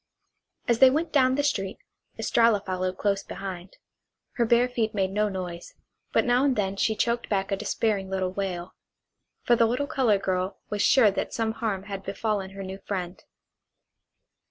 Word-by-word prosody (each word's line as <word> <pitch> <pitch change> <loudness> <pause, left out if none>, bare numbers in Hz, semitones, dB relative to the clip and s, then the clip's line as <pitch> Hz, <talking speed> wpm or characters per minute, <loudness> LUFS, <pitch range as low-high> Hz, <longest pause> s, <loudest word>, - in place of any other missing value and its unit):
As 235 -1 +2
they 265 - +9
went 315 +5 -1
down 260 -3 +4
the 285 - 0
street 195 -9 -1 0.4
Estralla 230 -3 +3
followed 185 -1 -3
close 200 -1 0
behind. 190 -2 -7 0.5
Her 240 - 0
bare 235 +2 +4
feet 225 -3 -2
made 190 -2 0
no 210 +1 +1
noise, 180 -3 -6 0.4
but - - +2
now 245 +1 +3
and 275 -2 +2
then 195 -2 -1
she 220 +2 +1
choked 235 +2 -1
back 195 -1 -1
a - - +2
despairing 205 -1 -1
little 190 -1 -1
wail. 185 -2 -4 0.7
For 240 - +4
the 230 -1 +4
little 250 +5 0
colored 245 -9 +1
girl 185 0 -1
was 205 -1 -1
sure 225 -5 +5
that - - -3
some 225 -1 0
harm 220 -4 -3
had 200 -1 -6
befallen 200 0 -2
her 195 - -5
new 190 +1 -7
friend. 185 -2 -5
205 Hz, 175 wpm, -26 LUFS, 190-235 Hz, 0.7 s, they